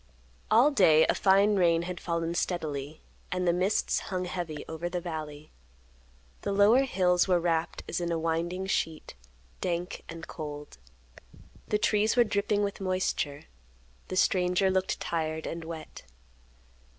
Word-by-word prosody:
All 245 +7 +5
day 160 - +5
a - - +2
fine 200 +2 +4
rain 170 -2 +3
had 180 0 -5
fallen 170 -1 -2
steadily, 155 -4 -3 0.3
and 180 0 -1
the 170 - +4
mists 185 +4 +1
hung 185 -1 -4
heavy 175 -4 -5
over 160 +2 -4
the 180 0 -2
valley. 155 -3 -7 0.9
The - - -2
lower 210 +7 +5
hills 180 -7 +2
were 180 -2 +3
wrapped 165 -1 -1
as 175 - -2
in 170 0 -2
a 165 - 0
winding 165 +3 -1
sheet; 160 -4 -2 0.5
dank 175 +2 -3
and 165 -1 -7
cold. 150 - -8 0.9
The 210 - +1
trees 210 +1 +2
were 245 - +6
dripping 205 -1 0
with 200 0 -3
moisture. 185 -6 -1 0.6
The 185 - -5
stranger 185 +1 +2
looked 190 0 0
tired 160 -1 -2
and 165 0 -5
wet. 160 -1 -8
175 Hz, 145 wpm, -28 LUFS, 160-190 Hz, 0.9 s, were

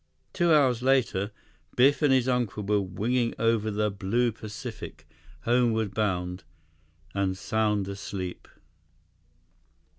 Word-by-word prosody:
Two 175 -1 +2
hours 130 -6 +4
later, 125 -7 +2 0.5
Biff 140 +5 +4
and 145 -3 +4
his 130 -1 +3
uncle 120 -5 0
were 105 0 +2
winging 115 +6 -1
over 115 -1 +1
the 105 0 0
blue 110 +5 0
Pacific, 105 -7 -8 0.3
homeward 115 -3 +1
bound—and 90 -1 -4
sound 105 -1 0
asleep. 95 -2 -6
105 Hz, 100 wpm, -27 LUFS, 95-120 Hz, 0.5 s, hours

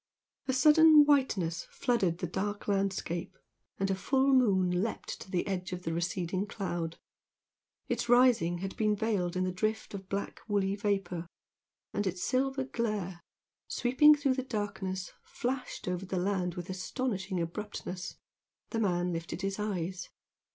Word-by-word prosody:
A 260 - +1
sudden 305 +3 +7
whiteness 205 - +2
flooded 195 -9 +1
the 180 - -3
dark 205 +4 -3
landscape, 195 -4 -1 0.4
and 195 0 0
a - - +3
full 265 +8 +2
moon 190 -8 +3
leaped 225 - -4
to - - -10
the 180 -2 0
edge 185 -2 -3
of 180 0 -5
the 165 - -2
receding 175 +3 -1
cloud. 175 -6 -3 0.9
Its 235 - -2
rising 245 -9 +5
had 195 - -5
been 215 -1 +2
veiled 200 -5 0
in 185 - +1
the 185 - 0
drift 215 +5 -2
of 195 -1 -7
black 200 0 -3
woolly 200 -2 +1
vapour, 195 -5 -1 0.7
and 205 - 0
its 180 -1 -2
silver 265 +1 +1
glare, 210 -8 -2 0.5
sweeping 295 +5 +5
through 285 -2 +1
the 260 - -1
darkness 195 -6 -3
flashed 250 -3 -4
over 180 +1 -2
the 190 - -2
land 180 -1 0
with 175 +1 -5
astonishing 190 -1 -2
abruptness. 180 +1 -5 0.6
The 225 - -1
man 180 -4 +1
lifted 165 +2 -5
his 195 +1 -2
eyes. 185 -3 -3
195 Hz, 150 wpm, -31 LUFS, 180-230 Hz, 0.9 s, sudden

